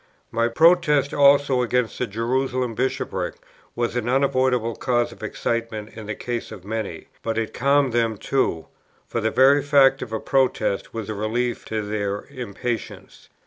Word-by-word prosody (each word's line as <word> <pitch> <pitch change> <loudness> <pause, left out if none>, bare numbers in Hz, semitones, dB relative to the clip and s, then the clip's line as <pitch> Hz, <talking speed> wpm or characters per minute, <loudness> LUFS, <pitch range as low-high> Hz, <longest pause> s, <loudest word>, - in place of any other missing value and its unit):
My 115 0 +1
Protest 150 +1 +4
also 140 -2 +4
against 125 -1 0
the 125 - 0
Jerusalem 125 +3 -1
Bishopric 130 +4 -2 0.4
was 120 0 -1
an 120 -1 -1
unavoidable 130 -3 +1
cause 120 -1 0
of - - -14
excitement 115 -2 -3
in 110 -2 -8
the 110 - -3
case 120 -1 -4
of 95 - -10
many; 110 0 -4 0.2
but 115 -1 -2
it 115 -1 -2
calmed 140 -1 +2
them 115 -2 +1
too, 95 -10 -1 0.4
for 115 - -3
the 110 - +1
very 135 +4 +5
fact 135 -1 +4
of 110 - -6
a 110 - -2
Protest 130 -7 0
was 110 -3 -5
a 110 - -3
relief 115 +4 -2
to 110 -1 -3
their 105 -1 -3
impatience. 120 -2 -6
120 Hz, 160 wpm, -23 LUFS, 110-130 Hz, 0.4 s, very